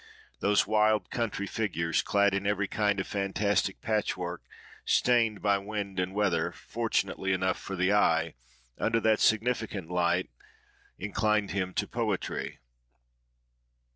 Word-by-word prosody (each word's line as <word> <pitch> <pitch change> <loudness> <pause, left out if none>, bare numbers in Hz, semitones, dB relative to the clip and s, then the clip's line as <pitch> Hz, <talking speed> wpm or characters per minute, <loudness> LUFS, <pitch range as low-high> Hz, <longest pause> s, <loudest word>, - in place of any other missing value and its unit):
Those 105 0 +3
wild 110 0 +2
country 115 -4 -2
figures, 90 -6 -1
clad 100 -1 +2
in 100 0 -1
every 105 -1 0
kind 105 -1 0
of 95 - -1
fantastic 100 0 0
patchwork, 100 -6 -2 0.4
stained 115 -4 +2
by 100 -1 +3
wind 100 -1 -4
and 90 +1 -2
weather 100 -4 +1
fortunately 95 0 -2
enough 95 0 0
for 95 - -6
the 95 +2 +2
eye, 85 -5 +3 0.5
under 115 0 +2
that 110 -1 +3
significant 110 -5 +1
light 90 -2 +1 0.7
inclined 105 +1 0
him 95 -1 -1
to - - 0
poetry. - - -3
100 Hz, 125 wpm, -29 LUFS, 95-105 Hz, 0.7 s, Those